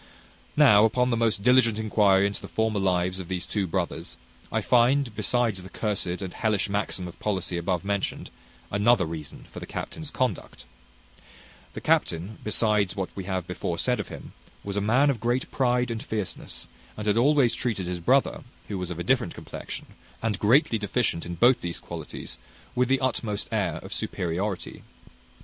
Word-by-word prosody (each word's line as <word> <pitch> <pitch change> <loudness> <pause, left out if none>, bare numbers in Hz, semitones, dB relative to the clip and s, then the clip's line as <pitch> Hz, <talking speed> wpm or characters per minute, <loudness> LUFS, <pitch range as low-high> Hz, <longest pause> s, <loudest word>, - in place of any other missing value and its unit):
Now, 105 0 +7
upon 125 +3 +3
the - - +3
most 115 -3 +1
diligent 125 -3 +5
enquiry 105 -3 +4
into 100 0 -2
the - - -7
former 110 -2 0
lives 90 -1 +1
of 90 - -6
these 90 -1 -2
two 100 -3 -1
brothers, 80 - -3 0.3
I - - +1
find, 125 0 +3
besides 110 -1 +1
the 95 - -10
cursed 105 -3 -1 0.2
and 95 - -5
hellish 110 -3 +1
maxim 100 -2 -2
of 85 - -11
policy 95 -4 -1
above 90 +1 -1
mentioned, 100 -1 -2 0.4
another 105 -1 +4
reason 80 -3 -7
for - - -7
the - - -8
captain's 155 -2 -5
conduct: 130 -3 -2 1.1
the - - -6
captain, 90 +6 +1
besides 105 -2 +2
what 95 -2 -4
we 95 - -5
have 95 -2 -2
before 90 -1 -3
said - - +1
of - - -3
him, - - -10 0.3
was 100 -1 -4
a 100 - +1
man 130 +8 +4
of 125 - -4
great 120 +3 0
pride 125 -2 +1
and 115 -1 -3
fierceness, 105 -4 -4 0.3
and 105 - -5
had 105 -1 +3
always 130 0 +4
treated 110 -7 -2
his 90 0 -3
brother, 130 +11 +2 0.3
who 100 -3 -3
was 90 -1 -4
of 90 - -5
a 85 - -3
different - - +1
complexion, - - -7 0.3
and 110 -3 -1
greatly 115 +1 +4
deficient 100 -5 0
in 85 - -4
both 120 +7 +5
these 85 -1 -4
qualities, 60 - -7 0.3
with 125 0 +2
the 135 0 +3
utmost 115 -5 -1
air 95 -8 0
of - - -6
superiority. 90 +3 -3
105 Hz, 175 wpm, -26 LUFS, 95-120 Hz, 1.1 s, Now